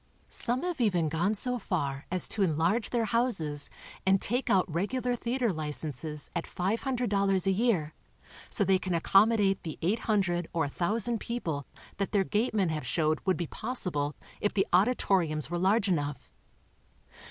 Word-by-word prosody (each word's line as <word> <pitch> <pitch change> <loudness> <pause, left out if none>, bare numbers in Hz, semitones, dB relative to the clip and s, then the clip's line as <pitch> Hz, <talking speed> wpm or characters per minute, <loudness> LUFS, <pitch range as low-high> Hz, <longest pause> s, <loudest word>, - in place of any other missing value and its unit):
Some 250 +5 +2
have 350 -6 -2
even 180 -8 +2
gone 175 +7 0
so 250 +3 +1
far 140 -9 -3
as 185 0 +2
to 215 - -2
enlarge 180 +6 +1
their 235 -2 0
houses, 195 - +1 0.3
and 190 0 +3
take 245 +7 -1
out 185 -2 +4
regular 245 +9 -1
theater 240 -2 -1
licenses 150 -1 -2
at 170 - -2
$500 200 -2 0
a 195 - +3
year, 190 -8 +1 0.6
so 210 - +2
they 190 -1 +3
can 185 -1 -2
accommodate 195 +2 +3
the 160 -3 -6
800 190 -3 0
or 165 -1 +1
1,000 210 +10 0
people 160 - -4 0.3
that 200 +1 -2
their 200 -2 +3
gatemen 210 -2 0
have 155 -1 -3
showed 155 -2 0
would 185 - +3
be 175 - -2
possible 150 - -3 0.2
if 205 - 0
the 195 - +3
auditoriums 180 - +2
were 175 - -1
large 200 +4 +2
enough. 145 -6 -2
190 Hz, 155 wpm, -29 LUFS, 160-225 Hz, 0.6 s, out